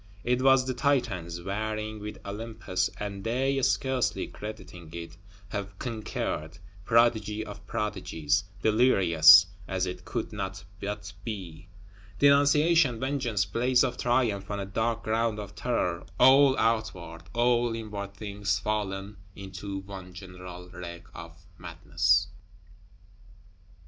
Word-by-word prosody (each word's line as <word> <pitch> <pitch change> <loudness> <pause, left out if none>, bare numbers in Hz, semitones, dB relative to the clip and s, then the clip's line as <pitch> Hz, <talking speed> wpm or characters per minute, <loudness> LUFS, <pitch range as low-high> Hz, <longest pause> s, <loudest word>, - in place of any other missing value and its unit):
It 125 +1 +1
was 135 -1 +5
the 130 - -1
Titans 110 - -1
warring 110 +2 -3
with 105 +1 -7
Olympus; 100 -3 -2
and 100 -1 -5
they, 135 +4 0
scarcely 130 -1 +1
crediting 105 -6 -9
it, 85 0 -7 0.3
have 100 -1 -5
conquered; 105 -8 -4 0.3
prodigy 110 -2 +2
of 100 -1 -10
prodigies; 95 -7 -1 0.2
delirious, 90 -7 +7 0.2
as 95 -1 -1
it 90 - -6
could - - -4
not 95 0 -5 0.2
but 100 -1 -5
be. 90 -6 -7 0.5
Denunciation, 145 -1 +4
vengeance; 130 -7 0
blaze 125 +5 +2
of 125 -2 -1
triumph 115 -5 +1
on 100 -1 -3
a 100 - -3
dark 115 +3 -1
ground 110 0 0
of 105 -1 -7
terror; 105 -6 -1 0.2
all 135 +1 +7
outward, 95 -7 -1
all 120 -1 +2
inward 105 -3 -6
things 100 -2 -2
fallen 100 -1 -3 0.2
into 95 0 -6
one 95 -2 -10
general 90 -1 -10
wreck 85 -1 -8
of 85 +1 -11
madness! 85 +3 +1
105 Hz, 120 wpm, -28 LUFS, 95-115 Hz, 0.5 s, delirious